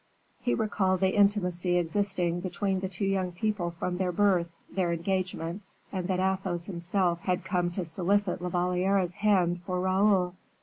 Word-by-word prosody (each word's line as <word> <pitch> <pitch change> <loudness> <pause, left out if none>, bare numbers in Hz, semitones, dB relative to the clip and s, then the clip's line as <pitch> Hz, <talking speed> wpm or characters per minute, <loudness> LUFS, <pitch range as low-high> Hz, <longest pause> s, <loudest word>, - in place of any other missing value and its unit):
He 245 - +1
recalled 195 -4 0
the 190 0 +2
intimacy 180 -4 +2
existing 175 0 0
between 190 +1 -1
the 190 0 -3
two 190 +1 -3
young 190 -2 0
people 190 -1 -1
from 180 +1 -3
their 185 -1 0
birth, 180 -2 +2 0.2
their 180 -3 -1
engagement, 180 +1 -2 0.3
and 185 -3 -3
that 185 -1 0
Athos 190 -2 -1
himself 175 -1 0
had 180 +1 -1
come 180 -2 0
to 180 -1 -1
solicit 185 +3 +1
La 180 - -2
Valliere's 180 +1 +1
hand 180 -4 +2
for 180 +1 -3
Raoul. 190 -1 +2
185 Hz, 160 wpm, -28 LUFS, 175-195 Hz, 0.3 s, the